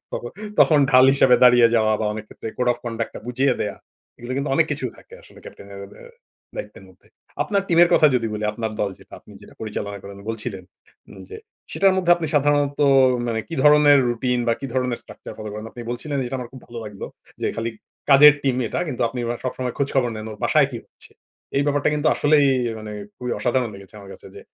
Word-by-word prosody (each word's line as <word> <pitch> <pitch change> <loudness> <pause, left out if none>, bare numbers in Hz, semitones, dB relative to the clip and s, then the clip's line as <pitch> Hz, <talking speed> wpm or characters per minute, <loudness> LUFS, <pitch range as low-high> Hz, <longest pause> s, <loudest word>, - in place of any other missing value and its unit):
তখন 120 - -5 0.3
তখন 155 -3 +5
ঢাল 130 0 +7
হিসেবে 130 -2 +5
দাঁড়িয়ে 120 -1 +6
যাওয়া 110 -1 +3
বা, 110 - -1
অনেক 110 0 -7
ক্ষেত্রে 110 - -8
code 125 -1 +1
of - - -11
conduct 115 -1 -4
টা - - -6
বুঝিয়ে 130 +1 +1
দেয়া, 105 - -3 0.4
এগুলো 120 +2 -7
কিন্তু 140 +1 -2
অনেক - - +3
কিছু - - -3
থাকে - - -16
আসলে - - -18
ক্যাপ্টেনের 100 0 -12
অ্যা 100 - -9
ব্যা - - -15 0.5
দায়িত্বের - - -8
মধ্যে। - - -23 0.4
আপনার 200 -2 -1
টিমের 170 0 +5
কথা 155 - +6
যদি 115 -2 +1
বলি, 105 0 -4
আপনার 110 0 -4
দল 100 - 0
যেটা, - - -21
আপনি - - -17
যেটা - - -16
পরিচালনা 105 -2 -5
করেন 100 0 -10
বলছিলেন, 105 -4 -5 0.4
উম - - -13
যে 435 - -8 0.4
সেটার 195 -1 +3
মধ্যে 180 -2 0
আপনি 165 -2 -4
সাধারণত 145 0 +1 0.5
মানে 110 -1 -1
কি 165 - -5
ধরনের 150 -1 +6
রুটিন 125 +1 -1
বা, - - +4
কি 135 - -4
ধরনের 125 -2 -1
structure - - -11
ফলো 110 0 -6
করেন? 105 +1 -7
আপনি 120 - -11
বলছিলেন 140 +4 -4
যেটা 130 +2 -4
আমার 120 -2 -7
খুব 130 - -11
ভালো 120 0 -9
লাগলো, 105 -2 -8 0.3
যে - - -1
খালি 115 +1 -2 0.4
কাজের 145 +2 +9
টিম 130 -2 0
এটা, 170 - -3
কিন্তু 125 -3 -3
আপনি 125 - -7
আবার 120 0 -3
সবসময় 125 -1 -3
খোঁজখবর 135 -3 0
নেন, 110 0 -7
ওর 105 - -8
বাসায় - - +3
কী - - -5
হচ্ছে? - - -13 0.5
এই 140 - +3
ব্যাপারটা 145 0 +1
কিন্তু 150 +1 -2
আসলেই 145 -1 +3 0.2
এ - - -4
মানে 110 0 -8 0.2
খুবই 125 -1 -4
অসাধারণ 125 -1 0
লেগেছে 100 +1 -14
আমার 100 -1 -12
কাছে, - - -14
যে - - -10
125 Hz, 220 wpm, -22 LUFS, 110-145 Hz, 0.5 s, কাজের